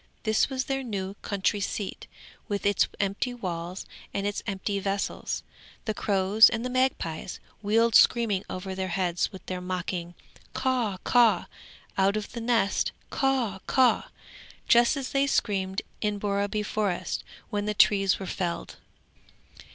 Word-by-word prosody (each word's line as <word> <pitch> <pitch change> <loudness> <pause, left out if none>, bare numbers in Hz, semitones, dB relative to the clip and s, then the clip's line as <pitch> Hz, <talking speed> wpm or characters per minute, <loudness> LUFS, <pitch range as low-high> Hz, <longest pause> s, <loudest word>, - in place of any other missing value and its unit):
This 220 +4 +2
was 265 -1 -2
their 270 0 -1
new 200 -6 -4
country 200 +1 0
seat 200 0 -4 0.4
with 205 -2 -3
its 205 -2 +3
empty 200 +5 -1
walls 180 -4 -5 0.3
and 200 - -1
its 205 0 -1
empty 200 0 -2
vessels. 195 0 -2 0.4
The 215 - 0
crows 200 +1 +5
and 230 +1 -3
the 250 - -2
magpies 250 -11 -1 0.2
wheeled 225 +2 +3
screaming 215 -6 +5
over 190 +1 -5
their 190 0 -2
heads 180 -1 0
with 190 - -11
their 185 -1 -4
mocking 180 -1 -4 0.4
"Caw, 250 -7 0
caw! 240 -3 +4 0.5
Out 195 +2 +3
of 210 - -5
the 235 - -5
nest, 225 -4 +1 0.2
Caw, 255 -8 +1
caw!" 260 -2 +3 0.6
just 240 +4 +5
as 270 -2 -4
they 275 0 +2
screamed 195 -6 0 0.2
in 210 -1 0
Borreby 205 +1 -1
Forest 205 -4 -2 0.3
when 205 0 -1
the 210 0 -1
trees 195 -2 +4
were 195 - -6
felled. 175 -2 -3
205 Hz, 145 wpm, -27 LUFS, 190-230 Hz, 0.6 s, crows